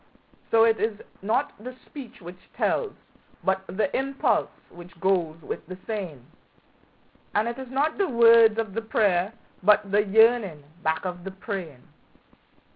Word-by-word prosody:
So 225 0 +5
it 225 -1 +3
is 215 -1 -1 0.2
not 240 +9 0
the 255 +1 -7
speech 270 -9 -11
which 180 +1 -10 0.2
tells, 440 -5 0 0.5
but 190 0 +1
the 210 +9 -1
impulse 275 +1 0 0.2
which 175 0 -14
goes 175 -4 0
with - - -5
the 185 +1 -8
saying; 180 - -5 1.1
And 210 +2 +2
it 235 +2 -4
is 260 -2 -8
not 290 +7 0
the 395 - +1
words 230 -2 +6
of 220 -3 -2
the 225 - -2
prayer, 205 -4 +1 0.3
but 205 0 +4
the 205 +1 +4
yearning 215 -6 +3 0.2
back 160 +1 -1
of 180 -1 -5
the 195 - -5
praying. 190 - -7
210 Hz, 150 wpm, -25 LUFS, 180-230 Hz, 1.1 s, words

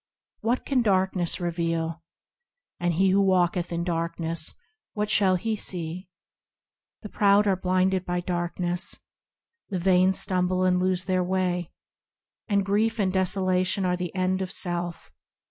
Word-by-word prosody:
What 235 +3 -1
can 265 -3 +2
darkness 190 -4 +1
reveal? 165 -1 -2 0.8
And 175 -1 0
he 190 +2 +3
who 200 +1 +4
walketh 180 -2 +1
in 170 0 -2
darkness, 165 -1 -3 0.4
what 210 0 -2
shall 195 -3 +4
he 220 +4 -1
see? 180 -2 -5 0.9
The 210 - -7
proud 200 0 +4
are 195 -2 +3
blinded 185 0 +1
by 180 -1 -2
darkness; 175 0 -2 0.7
The 195 - -2
vain 185 +1 +4
stumble 185 -1 +1
and 180 -1 +3
lose 185 -1 0
their 185 -1 +1
way; 180 -2 -1 0.8
And 200 -2 +1
grief 220 +3 +1
and 190 -3 0
desolation 185 0 +1
are 180 0 +1
the 180 0 -5
end 185 0 0
of 185 - -3
self. 175 -1 -2
185 Hz, 140 wpm, -26 LUFS, 175-190 Hz, 0.9 s, who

